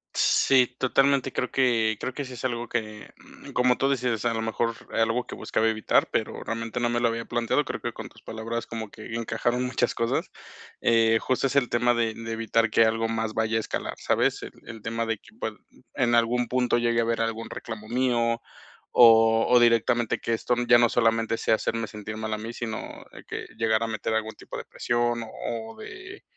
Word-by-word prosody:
Sí, 130 Hz, -2 st, +4 dB
totalmente. 135 Hz, +1 st, +2 dB
Creo -, -, -1 dB
que 115 Hz, -4 st, +2 dB
creo 130 Hz, -, -4 dB
que 145 Hz, -, -4 dB
sí 130 Hz, -1 st, -9 dB
es 125 Hz, -, -6 dB
algo 120 Hz, -1 st, -2 dB
que, 110 Hz, -2 st, -4 dB
mm, -, -, -15 dB
como 125 Hz, -1 st, +3 dB
tú 135 Hz, -, +2 dB
dices, 125 Hz, -5 st, 0 dB
a 120 Hz, -, +2 dB
lo 110 Hz, -, -1 dB
mejor 115 Hz, +1 st, -1 dB, 0.2 s
era 115 Hz, -, +2 dB
algo 115 Hz, +2 st, 0 dB
que -, -, -9 dB
buscaba 110 Hz, -, 0 dB
evitar, 110 Hz, -1 st, +2 dB
pero -, -, -2 dB
realmente 115 Hz, +1 st, -4 dB
no 120 Hz, -, +1 dB
me 120 Hz, 0 st, 0 dB
lo 120 Hz, -, +3 dB
había 115 Hz, 0 st, -2 dB
planteado, 120 Hz, -1 st, 0 dB
creo -, -, -5 dB
que -, -, -3 dB
con -, -, -8 dB
tus -, -, -19 dB
palabras 115 Hz, +1 st, -5 dB
como 110 Hz, -2 st, -6 dB
que 110 Hz, +1 st, -8 dB
encajaron 115 Hz, +2 st, -1 dB
muchas 125 Hz, -, 0 dB
cosas. 115 Hz, 0 st, -1 dB, 0.5 s
Eh, 115 Hz, -1 st, +4 dB
justo 130 Hz, +3 st, 0 dB
es 135 Hz, -, -4 dB
el 140 Hz, -3 st, +4 dB
tema 120 Hz, 0 st, +2 dB
de 115 Hz, -1 st, 0 dB
de 115 Hz, 0 st, -7 dB
evitar 115 Hz, 0 st, +1 dB
que 115 Hz, +1 st, +5 dB
algo 115 Hz, 0 st, +1 dB
más 115 Hz, -1 st, -2 dB
vaya 110 Hz, 0 st, 0 dB
a -, -, +2 dB
escalar, 110 Hz, -, -4 dB
¿sabes? -, -, +1 dB
El -, -, -7 dB, 0.2 s
el 115 Hz, -1 st, -9 dB
tema 115 Hz, 0 st, -2 dB
de 115 Hz, -1 st, -1 dB
que, 105 Hz, -, -20 dB
pues, 110 Hz, -, -3 dB, 0.4 s
en 120 Hz, -2 st, +2 dB
algún 120 Hz, +1 st, +2 dB
punto 125 Hz, 0 st, +1 dB
llegue 120 Hz, 0 st, +1 dB
a -, -, +3 dB
haber 115 Hz, 0 st, -1 dB
algún 115 Hz, 0 st, -3 dB
reclamo 110 Hz, -2 st, -7 dB
mío 120 Hz, -2 st, +1 dB, 0.5 s
o 115 Hz, -1 st, +6 dB
o 125 Hz, -, +6 dB
directamente 120 Hz, 0 st, +3 dB
que 115 Hz, -, -2 dB
esto 115 Hz, +2 st, 0 dB
ya 120 Hz, 0 st, +8 dB
no 120 Hz, -1 st, +4 dB
solamente 115 Hz, -1 st, +1 dB
sea 110 Hz, -, +2 dB
hacerme 115 Hz, 0 st, -2 dB
sentir 105 Hz, +1 st, -7 dB
mal 110 Hz, 0 st, -3 dB
a -, -, -1 dB
mí, 115 Hz, +2 st, -6 dB
sino 115 Hz, -2 st, -6 dB, 0.2 s
que, -, -, -6 dB
llegar 110 Hz, 0 st, +2 dB
a -, -, -1 dB
meter 110 Hz, 0 st, -3 dB
algún 110 Hz, 0 st, -2 dB
tipo -, -, -9 dB
de -, -, -7 dB
presión 120 Hz, 0 st, -1 dB
o 110 Hz, -, -10 dB, 0.4 s
o -, -, -14 dB
de 375 Hz, +1 st, -10 dB
115 Hz, 215 wpm, -26 LUFS, 110-120 Hz, 0.5 s, ya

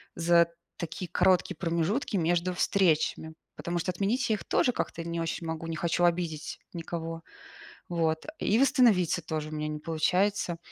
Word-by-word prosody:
за 170 Hz, 0 st, +4 dB, 0.3 s
такие 170 Hz, +1 st, -5 dB
короткие 185 Hz, -1 st, +3 dB
промежутки 170 Hz, -, -1 dB
между 175 Hz, +2 st, +1 dB
встречами? 160 Hz, -4 st, +1 dB, 0.2 s
Потому 175 Hz, 0 st, -2 dB
что 180 Hz, -, -3 dB
отменить 225 Hz, +7 st, 0 dB
я -, -, +3 dB
их -, -, -7 dB
тоже 250 Hz, -, +2 dB
как-то 165 Hz, -, -3 dB
не 170 Hz, 0 st, -2 dB
очень 165 Hz, 0 st, -3 dB
могу, 160 Hz, 0 st, -4 dB
не 165 Hz, -1 st, -3 dB
хочу 170 Hz, +1 st, 0 dB
обидеть 170 Hz, -3 st, -1 dB
никого. 165 Hz, -1 st, -5 dB, 0.7 s
Вот 160 Hz, -2 st, 0 dB
и 220 Hz, +4 st, +2 dB
восстановиться 220 Hz, -, +4 dB
тоже 155 Hz, -1 st, -3 dB
у -, -, -8 dB
меня 150 Hz, 0 st, -2 dB
не 150 Hz, 0 st, -4 dB
получается, 175 Hz, +3 st, 0 dB
170 Hz, 155 wpm, -29 LUFS, 165-185 Hz, 0.7 s, за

